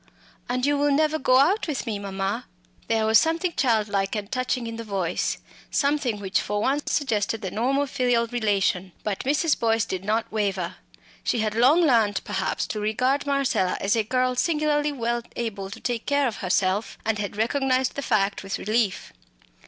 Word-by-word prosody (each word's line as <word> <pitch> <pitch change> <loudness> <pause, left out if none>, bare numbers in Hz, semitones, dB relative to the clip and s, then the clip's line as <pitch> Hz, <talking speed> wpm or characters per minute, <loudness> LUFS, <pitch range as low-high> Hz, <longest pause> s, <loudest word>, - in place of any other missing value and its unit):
"And 250 +1 0
you 290 0 +2
will 290 0 +3
never 310 +2 +2
go 255 -2 +4
out 350 +11 +3
with 290 -6 -3
me, 215 -4 -3
mamma?" 195 +4 -3 0.4
There 225 -1 +1
was 220 0 +6
something 330 +2 0
childlike 210 -5 +1
and 205 -1 -5
touching 255 -1 -1
in 230 0 -5
the 230 - -5
voice, 195 -5 -1 0.3
something 280 -7 0
which 195 -1 0
for 205 0 -2
once 275 +7 0
suggested 225 -5 0
the 190 - -3
normal 260 +7 +1
filial 245 -3 +1
relation. 200 -6 0
But 205 -3 -2
Mrs. 295 +3 +1
Boyce 225 -1 +2
did 185 -3 -4
not 220 +3 -1
waver. 195 -4 -2 0.5
She 235 - 0
had 215 -1 -1
long 260 +9 +5
learnt 225 - +3
perhaps - - -2
to 215 - -3
regard 255 +7 0
Marcella 275 -10 +1
as 200 +3 +1
a 225 - +3
girl 255 +3 0
singularly 300 0 +1
well 240 -3 -1
able 200 -5 -4
to 195 - -9
take 240 -2 -3
care 285 -1 +2
of 225 - -4
herself; 190 +2 0
and 220 -1 0
had 205 0 -4
recognised 260 +3 +1
the 280 - -4
fact 205 -6 +1
with 195 0 -4
relief. 210 - -1
230 Hz, 180 wpm, -25 LUFS, 205-270 Hz, 0.5 s, was